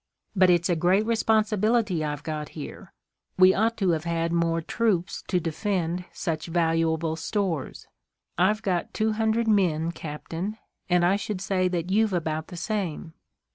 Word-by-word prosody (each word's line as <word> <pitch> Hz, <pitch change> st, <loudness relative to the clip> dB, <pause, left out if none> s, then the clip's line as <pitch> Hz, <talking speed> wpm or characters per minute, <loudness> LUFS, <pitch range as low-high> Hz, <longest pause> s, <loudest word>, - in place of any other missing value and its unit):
"But 185 Hz, -1 st, +5 dB
it's 175 Hz, -1 st, +3 dB
a 175 Hz, -, +2 dB
great 185 Hz, +6 st, +2 dB
responsibility 215 Hz, -4 st, +2 dB
I've 150 Hz, -1 st, -3 dB
got 155 Hz, -2 st, -4 dB
here. 150 Hz, -, -8 dB, 0.5 s
We 185 Hz, 0 st, +7 dB
ought 225 Hz, +2 st, +1 dB
to 190 Hz, -4 st, +2 dB
have 160 Hz, 0 st, -1 dB
had 170 Hz, 0 st, -1 dB
more 165 Hz, -1 st, +1 dB
troops 180 Hz, -1 st, -1 dB
to 180 Hz, -, +1 dB
defend 175 Hz, +1 st, -2 dB
such 160 Hz, -2 st, -3 dB
valuable 165 Hz, -1 st, +1 dB
stores. 165 Hz, -3 st, -3 dB, 0.5 s
I've 210 Hz, +5 st, +2 dB
got 180 Hz, -3 st, -1 dB
two 220 Hz, 0 st, +1 dB
hundred 220 Hz, +1 st, +1 dB
men, 170 Hz, -6 st, +2 dB
captain, 170 Hz, +6 st, -5 dB, 0.3 s
and 175 Hz, -1 st, +4 dB
I 190 Hz, +3 st, +3 dB
should 205 Hz, -1 st, -4 dB
say 185 Hz, -1 st, 0 dB
that 180 Hz, 0 st, -2 dB
you've 215 Hz, 0 st, +2 dB
about 160 Hz, -2 st, -2 dB
the 180 Hz, -, -9 dB
same." 180 Hz, -6 st, -3 dB
180 Hz, 155 wpm, -26 LUFS, 165-210 Hz, 0.5 s, We